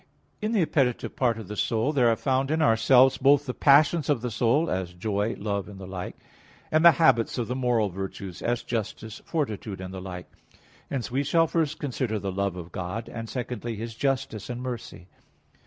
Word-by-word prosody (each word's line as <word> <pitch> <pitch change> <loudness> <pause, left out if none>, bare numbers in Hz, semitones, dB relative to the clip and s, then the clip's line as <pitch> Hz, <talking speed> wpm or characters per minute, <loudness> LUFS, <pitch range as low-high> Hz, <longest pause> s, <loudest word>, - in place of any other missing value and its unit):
In 215 +1 -1
the 210 -6 +3
appetitive 135 -6 0
part 120 -3 +1
of 110 -4 -8
the 105 - -6
soul 115 +7 0
there 125 -5 +4
are 115 - +3
found 135 +2 0
in 160 +1 +1
ourselves 130 0 +5
both 140 +1 +4
the 125 - -3
passions 150 +4 +4
of 140 -6 +2
the 125 - -2
soul, 120 +9 +2
as 95 - -2
joy, 105 +4 -1
love, 100 -1 -2
and 100 - -10
the 95 - -8
like; 90 -1 -6 0.6
and 155 +1 +3
the 170 -1 +9
habits 135 -7 +3
of 120 - -1
the 125 - -2
moral 120 -5 +1
virtues, 95 0 -6
as 120 0 -1
justice, 110 -1 -4
fortitude 110 - -3
and 95 0 -7
the 95 - -6
like. 90 -1 -7 0.6
Hence 130 -4 -3
we 135 +3 +1
shall 165 +3 +3
first 160 -2 -1
consider 125 -5 -2
the 100 -1 -3
love 100 -1 -1
of 90 -1 -8
God, 95 +7 -5
and 115 -1 -6
secondly 120 -1 -4
His 115 +2 -6
justice 130 -4 -2
and 120 0 -4
mercy. 120 -8 -6
120 Hz, 200 wpm, -26 LUFS, 100-135 Hz, 0.6 s, the